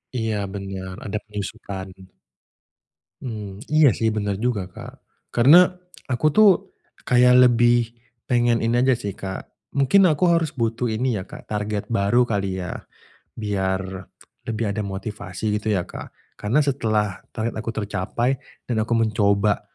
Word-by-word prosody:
Iya, 110 Hz, -3 st, -1 dB, 0.2 s
bener, 95 Hz, -1 st, -6 dB
ada 105 Hz, +1 st, -2 dB
penyusutan. 100 Hz, -2 st, -6 dB, 1.4 s
Mmm, 105 Hz, -5 st, -7 dB
iya 155 Hz, -2 st, +7 dB
sih 110 Hz, -1 st, +1 dB
bener 100 Hz, -2 st, -1 dB
juga, 105 Hz, -5 st, -1 dB
Kak. -, -, -10 dB, 0.4 s
Karena 150 Hz, +10 st, +8 dB, 0.4 s
aku 130 Hz, +2 st, -2 dB
tuh 215 Hz, +5 st, +6 dB, 0.5 s
kayak 125 Hz, 0 st, +6 dB
lebih 120 Hz, 0 st, +3 dB, 0.4 s
pengen 120 Hz, -1 st, +2 dB
ini 115 Hz, +1 st, +1 dB
aja 130 Hz, 0 st, +4 dB
sih, 105 Hz, -5 st, -4 dB
Kak, 95 Hz, 0 st, -6 dB, 0.2 s
mungkin 140 Hz, +8 st, +4 dB
aku 170 Hz, +2 st, +3 dB
harus 165 Hz, -3 st, +2 dB
butuh 115 Hz, 0 st, -1 dB
ini 115 Hz, 0 st, 0 dB
ya, 95 Hz, -, -5 dB
Kak, -, -, -12 dB
target 105 Hz, +1 st, -3 dB
baru 115 Hz, +3 st, +2 dB
kali 95 Hz, -3 st, -1 dB
ya, 90 Hz, -, -5 dB, 0.6 s
biar 95 Hz, -3 st, -3 dB, 0.4 s
lebih 110 Hz, -2 st, -1 dB
ada 105 Hz, -, -3 dB
motivasi 105 Hz, +1 st, -4 dB
gitu 110 Hz, -, -4 dB
ya, 95 Hz, -4 st, +1 dB
Kak. -, -, -9 dB, 0.3 s
Karena 120 Hz, +9 st, +2 dB
setelah 110 Hz, -8 st, 0 dB
target 115 Hz, 0 st, -2 dB
aku 115 Hz, +1 st, -3 dB
tercapai 105 Hz, +5 st, -1 dB, 0.3 s
dan 115 Hz, -3 st, -1 dB
aku 115 Hz, +2 st, 0 dB
mencoba 105 Hz, -2 st, +2 dB
110 Hz, 140 wpm, -23 LUFS, 100-120 Hz, 1.4 s, Karena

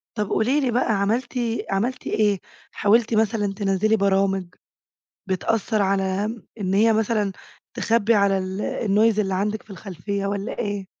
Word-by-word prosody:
طب 210 Hz, -2 st, -2 dB
قولي 255 Hz, +7 st, +2 dB
لي 260 Hz, -4 st, 0 dB
بقى 235 Hz, -1 st, +1 dB
عملتِ، 230 Hz, +5 st, 0 dB, 0.4 s
عملتِ 225 Hz, +7 st, -1 dB
إيه؟ 205 Hz, -3 st, +1 dB, 0.3 s
حاولتِ 225 Hz, +3 st, +2 dB
مثلًا 215 Hz, -2 st, +1 dB
تنزّلي 200 Hz, +2 st, +1 dB
برامج 195 Hz, -2 st, +1 dB, 0.8 s
بتأثر 210 Hz, +3 st, 0 dB
على 195 Hz, 0 st, 0 dB, 0.4 s
إن 190 Hz, -1 st, -1 dB
هي 225 Hz, +3 st, +5 dB
مثلًا 215 Hz, -2 st, 0 dB, 0.4 s
تخبي 230 Hz, 0 st, +2 dB
على 200 Hz, -2 st, +3 dB
ال 190 Hz, +1 st, -4 dB, 0.3 s
الnoise 215 Hz, +2 st, +3 dB
اللي 195 Hz, -3 st, 0 dB
عندِك 205 Hz, +3 st, -1 dB
في -, -, -22 dB
الخلفيّة، 195 Hz, +1 st, -4 dB
والّا 200 Hz, +1 st, -3 dB
إيه؟ 205 Hz, -3 st, -3 dB
205 Hz, 140 wpm, -23 LUFS, 195-220 Hz, 0.8 s, هي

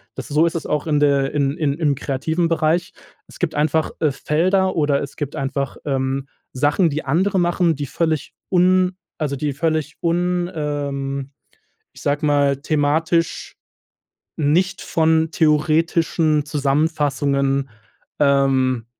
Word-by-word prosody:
Das -, -, -7 dB
so 150 Hz, +3 st, +3 dB
ist 170 Hz, -, -1 dB
es 160 Hz, -, -3 dB
auch, 150 Hz, +2 st, -2 dB
in 150 Hz, -1 st, +2 dB
der 140 Hz, -2 st, +2 dB
in 140 Hz, 0 st, 0 dB
in 145 Hz, -3 st, 0 dB
im 150 Hz, -3 st, +1 dB
kreativen 160 Hz, +6 st, -1 dB
Bereich. 165 Hz, +1 st, 0 dB, 0.3 s
Es -, -, -15 dB
gibt 175 Hz, -3 st, -1 dB
einfach, 155 Hz, +1 st, +1 dB
äh, 155 Hz, -3 st, +2 dB
Felder 185 Hz, +7 st, +1 dB
oder 145 Hz, -2 st, +2 dB
es 140 Hz, -, -8 dB
gibt 145 Hz, 0 st, -4 dB
einfach, 135 Hz, -1 st, -3 dB
ähm, 135 Hz, 0 st, -1 dB, 0.3 s
Sachen, 145 Hz, +6 st, +2 dB
die 150 Hz, +1 st, -3 dB
andere 185 Hz, +8 st, +1 dB
machen, 175 Hz, -1 st, +2 dB
die 145 Hz, 0 st, -4 dB
völlig 160 Hz, +2 st, -2 dB, 0.2 s
un 185 Hz, 0 st, +3 dB, 0.2 s
also, 145 Hz, -2 st, -1 dB
die 145 Hz, +1 st, -2 dB
völlig 155 Hz, +1 st, -1 dB
un 175 Hz, +1 st, 0 dB
ähm, 140 Hz, -2 st, -3 dB, 0.6 s
ich -, -, -14 dB
sage 145 Hz, +1 st, 0 dB
mal, 145 Hz, -2 st, +3 dB
thematisch 155 Hz, +3 st, 0 dB, 0.8 s
nicht 165 Hz, +6 st, +1 dB
von 160 Hz, 0 st, +2 dB
theoretischen 155 Hz, 0 st, +2 dB
Zusammenfassungen, 140 Hz, -2 st, 0 dB, 0.5 s
ähm, 135 Hz, -4 st, +2 dB
150 Hz, 135 wpm, -20 LUFS, 140-165 Hz, 0.8 s, so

